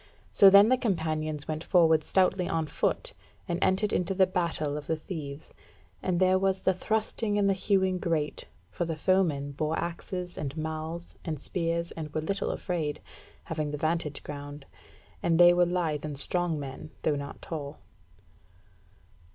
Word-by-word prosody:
So 195 - +8
then 200 +3 +8
the 255 0 +3
companions 155 - -1
went 155 +1 -3
forward 160 -4 +4
stoutly 185 0 +2
on 165 -1 0
foot, - - -1 0.3
and 175 -1 -1
entered 200 +3 +2
into 180 +2 0
the 190 0 +5
battle 170 -5 -1
of 150 -1 -6
the 160 - +1
thieves, 155 -3 -7 0.5
and 180 -2 0
there 185 0 +4
was 190 0 +1
the 190 - +3
thrusting 215 +2 -1
and 200 -1 +3
the 195 - +4
hewing 190 -1 +1
great: 160 -4 -2 0.2
for - - -2
the 165 -1 -2
foemen 155 -5 +1
bore 155 +3 -1
axes, 180 +1 -4
and 145 0 -4
malls, 160 +2 -5
and 155 -4 -4
spears, 170 +1 -2
and 155 -2 -6
were 155 - +1
little 195 +6 -2
afraid, 155 -5 -2 0.4
having 155 -2 -3
the 150 - -3
vantage 155 -1 -1
ground; 145 -1 -8 0.6
and 165 0 +2
they 175 0 +9
were 175 0 +4
lithe 170 -4 -1
and 150 -2 -5
strong 175 +1 -1
men, 140 +2 -7
though 150 - +2
not 140 0 -6
tall. 150 -3 -6
165 Hz, 165 wpm, -28 LUFS, 155-185 Hz, 0.6 s, they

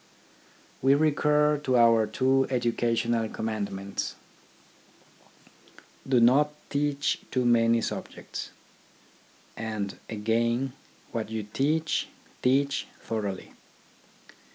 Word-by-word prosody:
We 135 +2 +5
recur 150 0 +3
to 130 -4 +1
our 115 -2 +5
two 130 +4 +2
educational 115 -2 0
commandments, 100 -3 -4 1.3
" - - -24
Do 130 -2 +4
not 130 +6 +5 0.2
teach 145 0 0
too 125 -1 0
many 115 -1 +4
subjects," - - -5 1.1
and 110 -3 -4
again, 115 +4 0 0.2
" - - -30
What 110 -2 -3
you 110 -1 -3
teach, 150 +9 0 0.3
teach 140 +2 +1
thoroughly." 100 -4 -4
120 Hz, 90 wpm, -27 LUFS, 110-140 Hz, 1.3 s, We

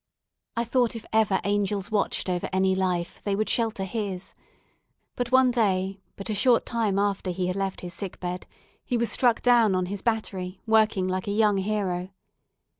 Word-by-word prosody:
I 235 - +2
thought 240 0 +1
if 225 - -7
ever 215 -3 +3
angels 205 0 -1
watched 205 -2 0
over 180 -1 -1
any 190 0 +2
life, 180 -2 -1
they 200 -1 -1
would 215 +2 -1
shelter 225 -4 0
his; 195 -2 -4 0.8
but 245 0 -2
one 260 -1 +5
day, 195 -4 0
but 195 - -7
a 215 - -1
short 235 +3 +3
time 220 -5 0
after 200 -2 0
he 180 +1 -1
had 180 0 -1
left 195 -1 -2
his 175 -1 -7
sick 195 -1 -5
bed, 180 0 -5 0.4
he 245 - -1
was 235 0 +1
struck 240 -3 +3
down 235 -5 +5
on 185 0 +1
his 195 +1 -5
battery, 195 -5 -2
working 215 -4 +3
like 185 +1 -2
a - - 0
young 210 -1 +3
hero. 190 -3 -1
200 Hz, 185 wpm, -26 LUFS, 185-225 Hz, 0.8 s, one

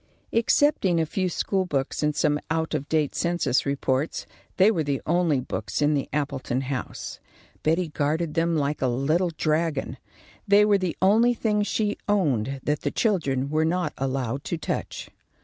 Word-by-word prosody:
Excepting 230 - +3
a 160 - +2
few 185 +3 -1
school 190 +1 -1
books 135 -5 -2
and 150 -1 +1
some 150 0 +2
out 160 0 -1
of 145 - -3
date 155 -3 +1
census 170 -7 0
reports, 140 +1 -1 0.3
they 195 +3 +6
were 165 -7 0
the 140 -2 -1
only 170 -4 +2
books 110 -4 -4
in 150 0 +3
the 140 -2 -1
Appleton 135 -3 -2
house. 135 -2 -5 0.4
Betty 165 +2 +1
guarded 150 +2 -1
them 165 -1 +1
like 145 0 -1
a 130 - +2
little 150 +9 +1
dragon. 155 -2 0 0.5
They 205 +1 +6
were 205 -1 +3
the 185 -3 -2
only 230 +5 +4
things 210 -2 0
she 210 -1 0
owned 135 - +1
that 150 0 -1
the 145 - -1
children 140 - 0
were 155 +1 +2
not 175 +3 0
allowed 135 -1 -2
to 170 - -2
touch. 160 - -4
155 Hz, 165 wpm, -25 LUFS, 140-180 Hz, 0.5 s, they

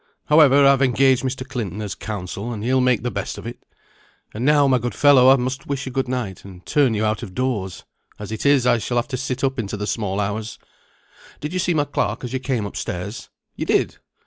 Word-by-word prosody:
However, 145 -2 +6
I've 140 -1 +5
engaged 130 0 +3
Mr. 130 0 -3
Clinton 110 - -4
as 105 -2 -4
counsel, 100 +2 -5
and 105 -3 -5
he'll 130 +2 +2
make 125 -3 +2
the 125 - -2
best - - -4
of 100 - -9
it. 120 - -7 0.7
And 110 - -4
now, 145 0 +4
my 130 -2 +3
good 120 +1 -4
fellow, 140 -3 +6
I 135 - +8
must 130 +1 -3
wish 140 -1 -3
you 130 - -5
good 135 0 -1
night, 120 -8 -4
and 95 -2 -13
turn 140 -7 +2
you 105 +1 0
out 110 +2 -1
of 95 -6 -8
doors. 105 -8 -2 0.3
As 105 0 -8
it 110 - -4
is, 140 -3 +4
I 120 -2 +3
shall 120 +2 -2
have 120 - 0
to 130 - -3
sit 130 +1 -4
up 135 -1 0
into 105 -2 -3
the 105 - -3
small 105 -2 -2
hours. 105 +2 -3 0.8
Did 150 +3 -5
you 185 - -1
see 175 -1 +1
my 145 -1 +2
clerk 145 - -2
as 125 0 -5
you 130 - -1
came 125 -5 -2
up 100 - -7
stairs? 90 +6 -5 0.3
You - - -4
did! - - +1
125 Hz, 235 wpm, -21 LUFS, 105-135 Hz, 0.8 s, I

